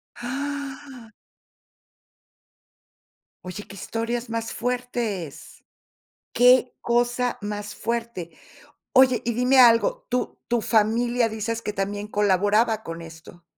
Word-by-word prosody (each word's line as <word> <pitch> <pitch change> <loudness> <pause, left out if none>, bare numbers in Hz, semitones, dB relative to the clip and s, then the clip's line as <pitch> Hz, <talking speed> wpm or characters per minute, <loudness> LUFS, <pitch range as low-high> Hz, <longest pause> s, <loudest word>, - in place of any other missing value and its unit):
¡Ah! 270 -1 -6 2.3
Oye, 185 +3 -7
qué 195 - -12
historias 230 +3 -3
más 230 0 -3
fuertes, 240 - -4 0.7
qué 250 0 +5
cosa 240 +1 +1
más 205 0 -5
fuerte. 230 -7 -4 0.6
Oye, 255 -1 +6
y 235 - 0
dime 250 +2 +3
algo, 255 - +4
¿tu 250 -1 -2
tu 240 -2 +1
familia 235 +2 +2
dices 225 +1 -3
que 210 -2 -4
también 205 +1 -3
colaboraba 210 +2 +2
con 165 0 -7
esto? 165 +1 -13
230 Hz, 100 wpm, -24 LUFS, 205-245 Hz, 2.3 s, Oye